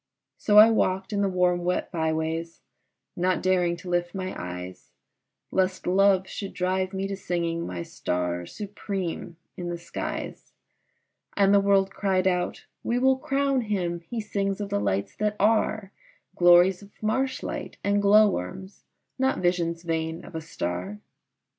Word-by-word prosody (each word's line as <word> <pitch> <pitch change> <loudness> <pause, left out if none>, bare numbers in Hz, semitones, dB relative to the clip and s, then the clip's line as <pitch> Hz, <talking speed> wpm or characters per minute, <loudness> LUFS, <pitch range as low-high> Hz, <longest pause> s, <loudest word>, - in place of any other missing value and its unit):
So 210 -1 +3
I 220 +2 +10
walked 190 -2 0
in 200 - +1
the 200 - +2
warm 180 -1 +1
wet 180 +1 -1
by 160 -2 0
ways, 160 +1 -3 0.5
not 180 +1 0
daring 180 -2 +2
to 180 +2 -12
lift 175 +1 -1
my 185 -1 -3
eyes 90 +1 -7 0.6
Lest 190 0 0
love 190 +1 +3
should 195 +1 -6
drive 185 +1 0
me 195 0 -2
to 195 - -3
singing 170 -3 -2
my 90 -2 -4
star 90 0 -3
supreme 195 -5 -5 0.2
in 175 -1 -4
the 175 - -3
skies, 170 - -6 0.8
And 200 0 +5
the 200 - +7
world 195 -1 +3
cried 190 -2 0
out, 180 -1 0 0.2
"We 240 - 0
will 260 +1 +3
crown 275 -1 +1
him, 185 -6 -2
he 200 +8 -6
sings 200 -2 -2
of 205 -1 -4
the - - 0
lights 100 0 -1
that 210 -1 0
are, 215 -1 +1 0.4
Glories 175 +2 +6
of 200 - -13
marshlight 260 +5 -2
and 200 0 +2
glow 210 +2 +6
worms, 190 - -5 0.3
not 265 0 +2
visions 170 -1 0
vain 165 0 -3
of - - -12
a 160 - -4
star!" 95 - -4
185 Hz, 155 wpm, -26 LUFS, 170-200 Hz, 0.8 s, I